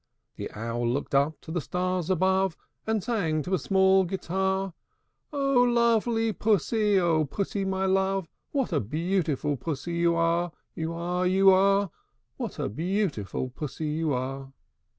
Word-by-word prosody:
The - - -5
Owl 115 +2 -2
looked 140 +4 -2
up 140 +3 +2
to 160 - -9
the 175 0 -1
stars 180 +1 -2
above, 190 -1 +2 0.3
And 220 -3 0
sang 165 -10 0
to 185 - -4
a 185 - +2
small 190 0 +4
guitar, 190 +1 -1 0.6
"O 275 -3 +2
lovely 235 -2 +2
Pussy, 210 0 +2
O 165 -3 +2
Pussy, 195 +6 -2
my 190 0 0
love, 190 -1 +1 0.2
What 270 -9 -1
a 150 - +3
beautiful 155 - -1
Pussy 165 +3 -4
you 170 0 +3
are, 170 +1 +1 0.2
You 160 0 -3
are, 180 +2 -1
You 190 +1 +6
are! 195 0 +3 0.5
What - - -5
a - - -1
beautiful 160 - -2
Pussy 150 +3 -4
you 155 0 -1
are!" 135 +1 -3
180 Hz, 150 wpm, -27 LUFS, 155-195 Hz, 0.6 s, You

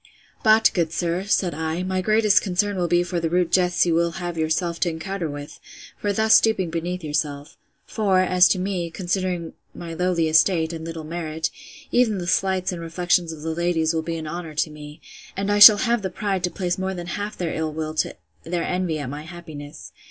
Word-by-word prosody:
But, 220 +1 +5
good 170 -3 0
sir, 175 +2 -2
said 190 -4 +1
I, 160 +3 -3
my 185 0 -1
greatest 215 0 +3
concern 200 +1 0
will 180 -2 0
be 175 +1 +2
for 175 0 -3
the 165 -1 -1
rude 175 0 +1
jests 180 -1 +3
you 170 - +1
will 170 0 +1
have 175 0 -5
yourself 165 +2 -1
to 175 - +1
encounter 165 +1 -4
with, 145 0 -8 0.4
for 205 - -2
thus 220 +2 +4
stooping 195 -7 +1
beneath 175 +2 -3
yourself. 150 -1 -3 0.3
For, 200 -4 +1
as 180 -1 +5
to - - +1
me, 180 -2 -2
considering 180 -1 -3 0.2
my 170 -1 -7
lowly 175 -1 0
estate, 160 +1 +3
and 160 -1 -6
little 165 -1 -6
merit, 160 0 -4 0.4
even 235 -4 +2
the 180 - -4
slights 185 +1 0
and 175 -2 -6
reflections 175 0 0
of 155 -2 -9
the 160 0 -2
ladies 170 -1 0
will 160 - 0
be 165 +1 -4
an 160 - -6
honour 160 0 -6
to 155 +1 0
me: 150 0 -11 0.4
and 200 +1 -1
I 205 - +2
shall 210 0 +11
have 235 0 +1
the 190 - -3
pride 195 -1 -2
to - - -1
place 180 0 -3
more 190 0 -2
than 175 -1 -6
half 205 +4 -5
their 170 -3 -2
ill 160 -1 -2
will 155 0 -4
to - - 0 0.3
their 170 0 -2
envy 180 -3 -1
at 145 -3 -5
my 145 +3 -6
happiness. 155 -3 -10
175 Hz, 210 wpm, -23 LUFS, 160-185 Hz, 0.4 s, shall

